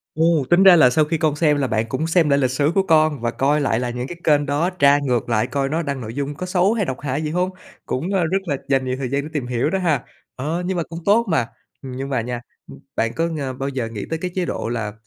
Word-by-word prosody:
Ồ, 160 Hz, -2 st, +3 dB
tính 175 Hz, +3 st, +5 dB
ra 190 Hz, -2 st, +9 dB
là 130 Hz, -7 st, +6 dB
sau 150 Hz, +4 st, +2 dB
khi 165 Hz, +1 st, -1 dB
con 155 Hz, -1 st, +1 dB
xem 150 Hz, -2 st, +2 dB
là 135 Hz, -2 st, 0 dB
bạn 110 Hz, -1 st, 0 dB
cũng 155 Hz, +7 st, -2 dB
xem 165 Hz, -3 st, +3 dB
lại 140 Hz, 0 st, +3 dB
lịch 130 Hz, -2 st, +1 dB
sử 145 Hz, +4 st, +1 dB
của 195 Hz, -, +3 dB
con, 155 Hz, -6 st, +3 dB
và 120 Hz, -1 st, 0 dB
coi 145 Hz, +4 st, +1 dB
lại 120 Hz, -4 st, +1 dB
là 125 Hz, -1 st, -2 dB
những 125 Hz, +2 st, -4 dB
cái 175 Hz, -, -8 dB
kênh 145 Hz, -1 st, +3 dB
đó, 150 Hz, +6 st, 0 dB
tra 145 Hz, -5 st, +4 dB
ngược 125 Hz, -4 st, -1 dB
lại 110 Hz, +1 st, +1 dB
coi 135 Hz, +1 st, -1 dB
nó 160 Hz, +2 st, 0 dB
đăng 140 Hz, -3 st, -3 dB
nội 110 Hz, 0 st, -6 dB
dung 145 Hz, +1 st, -3 dB
có 185 Hz, -, -5 dB
xấu 185 Hz, +3 st, +2 dB
hay 210 Hz, -5 st, 0 dB
độc 130 Hz, -, -4 dB
hại 145 Hz, +1 st, -2 dB
gì 150 Hz, -, -2 dB
hông? 180 Hz, +2 st, 0 dB, 0.4 s
Cũng, 170 Hz, +10 st, -2 dB
a, 185 Hz, -3 st, +2 dB
rất 180 Hz, +4 st, +1 dB
là 140 Hz, -5 st, -1 dB
dành 135 Hz, -1 st, +1 dB
nhiều 130 Hz, 0 st, -1 dB
thời 130 Hz, -2 st, -3 dB
gian 140 Hz, +1 st, -1 dB
để 155 Hz, -, -7 dB
tìm 140 Hz, -5 st, -2 dB
hiểu 125 Hz, +4 st, 0 dB
đó 190 Hz, -, 0 dB
ha. 155 Hz, -8 st, +1 dB, 0.3 s
Ờ, 160 Hz, +7 st, -3 dB
nhưng 185 Hz, -1 st, -1 dB
mà 170 Hz, -, 0 dB
cũng 165 Hz, +1 st, -8 dB
tốt 220 Hz, +4 st, +4 dB
mà, 130 Hz, -8 st, +1 dB, 0.3 s
nhưng 135 Hz, +1 st, -6 dB
mà 125 Hz, -4 st, 0 dB
nha, 120 Hz, 0 st, -4 dB, 0.3 s
ưm, -, -, -12 dB, 0.2 s
bạn 115 Hz, 0 st, 0 dB
có 165 Hz, -, 0 dB
ng 140 Hz, -6 st, -4 dB
bao 135 Hz, +1 st, -2 dB
giờ 125 Hz, -4 st, -3 dB
nghĩ 110 Hz, -3 st, -6 dB
tới 160 Hz, 0 st, -2 dB
cái 180 Hz, -1 st, -3 dB
chế 180 Hz, -2 st, 0 dB
độ 115 Hz, -, -3 dB
là, 110 Hz, -3 st, -3 dB
145 Hz, 295 wpm, -21 LUFS, 130-165 Hz, 0.4 s, ra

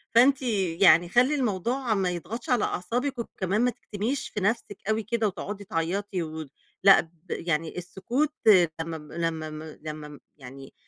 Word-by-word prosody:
فأنتِ 270 Hz, +3 st, +6 dB, 0.4 s
يعني 175 Hz, -2 st, +6 dB
خلّي 255 Hz, +7 st, +4 dB
الموضوع 240 Hz, +1 st, 0 dB
ما 190 Hz, -3 st, +1 dB
يضغطش 195 Hz, +9 st, -6 dB
على 245 Hz, -3 st, +3 dB
أعصابِك 245 Hz, +8 st, -2 dB
وكمان 200 Hz, -1 st, -1 dB
ما 250 Hz, -, +4 dB
تكتميش 235 Hz, +2 st, -4 dB
في 210 Hz, -, -4 dB
نفسِك 205 Hz, -1 st, -1 dB
أوي 215 Hz, 0 st, +1 dB
كده 225 Hz, 0 st, 0 dB
وتقعُدي 200 Hz, +1 st, -5 dB
تعيطي 185 Hz, +2 st, -2 dB
وت 155 Hz, -3 st, -7 dB, 0.3 s
لأ، 195 Hz, -1 st, +9 dB
د 165 Hz, -, -16 dB, 0.2 s
يعني 165 Hz, 0 st, -2 dB
السكوت 240 Hz, -, -2 dB, 0.5 s
لمّا 165 Hz, 0 st, -4 dB
ب 150 Hz, -1 st, -13 dB
لمّا 160 Hz, -2 st, -2 dB
م 155 Hz, 0 st, -7 dB, 0.2 s
لمّا 155 Hz, -1 st, -6 dB
م 145 Hz, -1 st, -12 dB, 0.2 s
يعني 135 Hz, 0 st, -11 dB
195 Hz, 160 wpm, -27 LUFS, 165-235 Hz, 0.5 s, لأ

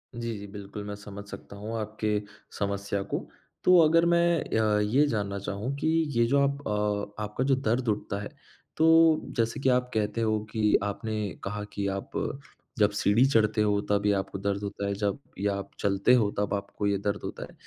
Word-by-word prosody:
जी, 115 Hz, -2 st, -3 dB
जी 100 Hz, -, -8 dB
बिल्कुल, 100 Hz, +1 st, -8 dB
मैं 105 Hz, 0 st, -5 dB
समझ 100 Hz, 0 st, -9 dB
सकता 100 Hz, -, -10 dB
हूँ 110 Hz, +3 st, -5 dB
आपके 105 Hz, 0 st, -1 dB, 0.4 s
समस्या 100 Hz, 0 st, -1 dB
को। -, -, -2 dB, 0.4 s
तो 180 Hz, 0 st, +7 dB
अगर 165 Hz, +1 st, +5 dB
मैं 170 Hz, -1 st, +3 dB, 0.2 s
अ, 105 Hz, -1 st, +3 dB
ये 120 Hz, +8 st, +3 dB
जानना 100 Hz, -5 st, -2 dB
चाहूँ 100 Hz, +6 st, -3 dB
कि 155 Hz, -, -1 dB, 0.3 s
ये 120 Hz, -, +5 dB
जो 140 Hz, +3 st, +3 dB
आप 140 Hz, 0 st, -2 dB, 0.6 s
अ, 105 Hz, -, -5 dB
आपका 105 Hz, +5 st, -2 dB
जो 135 Hz, 0 st, +3 dB
दर्द 125 Hz, -1 st, 0 dB
उठता 100 Hz, -1 st, -2 dB
है, 100 Hz, -, -6 dB, 0.5 s
तो 160 Hz, 0 st, +6 dB, 0.2 s
जैसे 115 Hz, +4 st, 0 dB
कि 135 Hz, -, +2 dB
आप 125 Hz, 0 st, +2 dB
कहते 110 Hz, +1 st, 0 dB
हो 110 Hz, -1 st, +1 dB
कि 110 Hz, -2 st, +2 dB
आपने 105 Hz, +1 st, -2 dB
कहा 105 Hz, +1 st, -3 dB
कि 100 Hz, -1 st, -2 dB
आप, 95 Hz, 0 st, -4 dB, 0.7 s
जब 105 Hz, -1 st, +4 dB
सीढ़ी 105 Hz, +4 st, +3 dB
चढ़ते 110 Hz, -5 st, +3 dB
हो, 105 Hz, -1 st, +2 dB
तब 100 Hz, 0 st, +2 dB
ये 105 Hz, -, +4 dB
आपको 95 Hz, 0 st, -2 dB
दर्द 100 Hz, +1 st, -1 dB
होता 100 Hz, 0 st, -4 dB
है, 100 Hz, -, 0 dB
जब 100 Hz, +2 st, -1 dB, 0.2 s
या 100 Hz, 0 st, 0 dB
आप 100 Hz, 0 st, -5 dB
चलते 100 Hz, +4 st, +3 dB
हो 115 Hz, -5 st, +4 dB
तब 105 Hz, 0 st, 0 dB
आपको 100 Hz, +1 st, -2 dB
ये 100 Hz, -, +2 dB
दर्द 100 Hz, +1 st, -2 dB
होता -, -, -5 dB
है। -, -, -16 dB
105 Hz, 200 wpm, -28 LUFS, 100-120 Hz, 0.7 s, तो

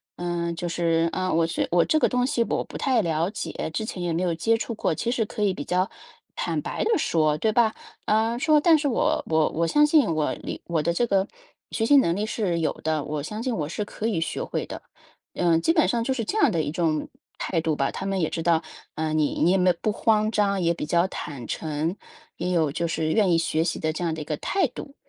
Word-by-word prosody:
“呃， 175 Hz, -1 st, -2 dB
就 175 Hz, +1 st, -4 dB
是 165 Hz, -1 st, +1 dB
啊， 185 Hz, -1 st, -1 dB
我 165 Hz, 0 st, +3 dB
是 170 Hz, -, -1 dB
我 175 Hz, 0 st, +4 dB
这 310 Hz, -, +2 dB
个 -, -, +4 dB
东 250 Hz, -1 st, +1 dB
西 245 Hz, -4 st, +1 dB
我 -, -, -1 dB
不 -, -, -9 dB
太 255 Hz, -4 st, +2 dB
了 165 Hz, -1 st, 0 dB
解， 165 Hz, -6 st, -4 dB
之 220 Hz, -, -2 dB
前 200 Hz, -4 st, -5 dB
也 175 Hz, -1 st, -1 dB
没 170 Hz, +3 st, 0 dB
有 175 Hz, -2 st, +1 dB
接 225 Hz, +8 st, +1 dB
触 230 Hz, -, -4 dB
过。” 165 Hz, -, -1 dB
其 235 Hz, -, -1 dB
实 235 Hz, -3 st, 0 dB
可 210 Hz, 0 st, -4 dB
以 195 Hz, -, +2 dB
比 145 Hz, -, -6 dB
较 185 Hz, +3 st, +1 dB, 0.4 s
坦 -, -, -2 dB
白 -, -, -3 dB
地 450 Hz, -3 st, +3 dB
说， 155 Hz, -, +1 dB
对 215 Hz, +7 st, +1 dB
吧？ 220 Hz, 0 st, +3 dB, 0.3 s
呃， 225 Hz, +2 st, +1 dB
说：” 305 Hz, +1 st, +4 dB
但 330 Hz, -2 st, +6 dB
是 290 Hz, -, 0 dB
我 245 Hz, -, +1 dB
我 160 Hz, -1 st, +2 dB
我 165 Hz, +1 st, 0 dB
相 295 Hz, -, +5 dB
信 290 Hz, -, +3 dB
我 155 Hz, -1 st, 0 dB
理 -, -, -7 dB
我 165 Hz, -3 st, 0 dB
的 170 Hz, +2 st, 0 dB
这 240 Hz, -, +1 dB
个 195 Hz, -1 st, +2 dB, 0.4 s
学 225 Hz, -, 0 dB
习 285 Hz, +4 st, +6 dB
能 170 Hz, -10 st, +3 dB
力 205 Hz, +2 st, -1 dB
是 200 Hz, -6 st, -1 dB
有 155 Hz, -, +1 dB
的， 155 Hz, -2 st, 0 dB
我 150 Hz, 0 st, -3 dB
相 215 Hz, +9 st, -5 dB
信 255 Hz, -, -1 dB
我 150 Hz, -, -2 dB
是 205 Hz, +6 st, -3 dB
可 215 Hz, +2 st, -4 dB
以 180 Hz, -8 st, 0 dB
学 170 Hz, -, -2 dB
会 -, -, -3 dB
的。” -, -, -8 dB, 0.5 s
呃， 170 Hz, -2 st, +3 dB
基 330 Hz, -, +2 dB
本 315 Hz, -, +3 dB
上 235 Hz, -1 st, 0 dB
就 265 Hz, -, +1 dB
是 235 Hz, -3 st, -2 dB
这 425 Hz, -, -2 dB
样 295 Hz, -, +5 dB
的 165 Hz, -, +1 dB
一 145 Hz, -, -3 dB
种 160 Hz, -3 st, -1 dB, 0.3 s
态 170 Hz, -, -1 dB
度 160 Hz, -1 st, 0 dB
吧。 135 Hz, -1 st, 0 dB
他 195 Hz, -, -6 dB
们 195 Hz, -2 st, -1 dB
也 160 Hz, -, +1 dB
知 165 Hz, -, -3 dB
道， 165 Hz, -1 st, +2 dB, 0.3 s
呃， 155 Hz, 0 st, -2 dB
你 155 Hz, -2 st, 0 dB
你 175 Hz, -, +4 dB
也 190 Hz, -, +3 dB
没 180 Hz, 0 st, +4 dB
有 -, -, -4 dB
不 215 Hz, -, +1 dB
慌 215 Hz, 0 st, +2 dB
张， 200 Hz, -3 st, +1 dB
也 170 Hz, 0 st, +2 dB
比 160 Hz, -, -5 dB
较 170 Hz, +3 st, +2 dB
坦 140 Hz, -6 st, -6 dB
诚， 160 Hz, +4 st, -2 dB, 0.4 s
也 180 Hz, +1 st, -2 dB
有 160 Hz, -5 st, +2 dB
就 170 Hz, +2 st, -2 dB
是 160 Hz, -1 st, -1 dB
愿 205 Hz, -1 st, +3 dB
意 -, -, +4 dB
学 165 Hz, -1 st, 0 dB
习 -, -, -2 dB
的 155 Hz, -, 0 dB
这 155 Hz, -, -6 dB
样 165 Hz, -, 0 dB
的 155 Hz, -, -6 dB
一 -, -, -6 dB
个 150 Hz, -1 st, -3 dB
态 390 Hz, -2 st, 0 dB
度。 275 Hz, +3 st, -10 dB
175 Hz, 280 characters per minute, -25 LUFS, 160-225 Hz, 0.5 s, 但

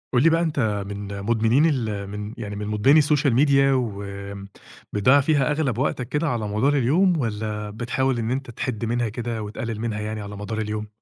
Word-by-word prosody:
قُل 125 Hz, -, +4 dB
لي 165 Hz, -, +6 dB
بقى، 165 Hz, +1 st, +2 dB
أنت 115 Hz, -11 st, 0 dB
من 100 Hz, 0 st, -6 dB
مُدمنين 115 Hz, +7 st, +3 dB
ال 110 Hz, -9 st, -1 dB
من 105 Hz, +1 st, -6 dB
يعني 105 Hz, -3 st, -5 dB
من 105 Hz, 0 st, -4 dB
مُدمنين 135 Hz, +9 st, +4 dB
الSocial 145 Hz, -2 st, +2 dB
Media 140 Hz, -2 st, +3 dB, 0.2 s
وم 100 Hz, -4 st, -4 dB, 0.5 s
بتضيّع 125 Hz, +8 st, +5 dB
فيها 145 Hz, -1 st, +2 dB
أغلَب 145 Hz, -6 st, 0 dB
وقتك 125 Hz, -2 st, -1 dB
كده 150 Hz, +4 st, 0 dB
على 115 Hz, -5 st, -2 dB
مدار 110 Hz, +8 st, +1 dB
اليوم 170 Hz, +8 st, +3 dB
والّا 105 Hz, -3 st, -3 dB
بتحاول 120 Hz, +4 st, -1 dB
إن 115 Hz, +1 st, -2 dB
أنت 130 Hz, -1 st, -3 dB
تحِد 115 Hz, -1 st, -3 dB
منها 120 Hz, 0 st, 0 dB
كده 115 Hz, 0 st, -4 dB
وتقلِّل 110 Hz, +1 st, -5 dB
منها 110 Hz, -2 st, -2 dB
يعني 110 Hz, 0 st, -4 dB
على 100 Hz, 0 st, -7 dB
مدار 105 Hz, +2 st, -5 dB
اليوم؟ 105 Hz, 0 st, -3 dB
115 Hz, 190 wpm, -23 LUFS, 105-135 Hz, 0.5 s, لي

